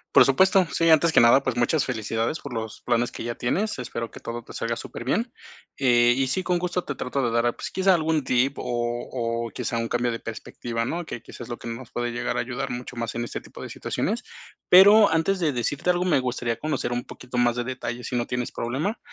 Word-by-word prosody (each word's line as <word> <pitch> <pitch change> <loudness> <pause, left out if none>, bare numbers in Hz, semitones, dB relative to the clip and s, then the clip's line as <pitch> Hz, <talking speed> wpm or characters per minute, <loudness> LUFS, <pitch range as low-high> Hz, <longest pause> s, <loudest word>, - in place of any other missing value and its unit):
Por - - +9
supuesto, 185 +5 +4
sí, 165 0 +3
antes 160 +1 +5
que - - +7
nada, 120 +3 +6
pues 130 -2 -2
muchas 120 +5 +2
felicidades 115 +3 -2
por 140 -3 -7
los 110 -1 -5
planes 120 0 0
que - - -6
ya 120 0 -3
tienes, 190 - -1
espero 115 -2 -5
que - - -10
todo 120 0 -6
te - - -13
salga 115 +1 -2
superbien. 170 - -3 0.5
Eh 120 -2 +4
y 135 - +1
sí, 185 +9 -1
con 180 -1 +1
gusto 180 0 -1
te 145 - -5
trato 135 +1 -2
de 115 - +1
dar, 115 +1 +1
pues, - - -6
quizá 190 0 +3
algún 160 -2 +1
tip 130 +3 +1
o 120 -1 -1 0.2
o 115 -1 -2
quizá 120 - -3
un 115 0 -1
cambio 120 +1 0
de 115 - -4
perspectiva, 115 +1 -5
¿no? 170 +8 -3
Que 120 - -6
quizás - - -12
es 120 - -8
lo 120 - -4
que 120 - -7
nos 115 +1 -7
puede 120 0 -2
llegar 120 - -2
a - - +1
ayudar 130 +3 -4
mucho 125 0 -6
más 115 -1 -3
en 120 - -1
este 120 - -5
tipo - - -13
de - - -7
situaciones. - - -2 0.5
Pero, 205 +3 +8
antes 165 +4 +1
de 160 -5 +1
decirte 130 +7 -1
algo, 180 0 +2
me 175 -6 +3
gustaría 125 -2 -2
conocer 145 -5 -2
un 120 0 -2
poquito 125 0 -8
más 120 -1 +3
de 120 - -1
detalle, 125 -1 -5
si 125 - -4
no 120 - -1
tienes 125 -1 -2
problema. 140 - -2
125 Hz, 240 wpm, -25 LUFS, 120-160 Hz, 0.5 s, Por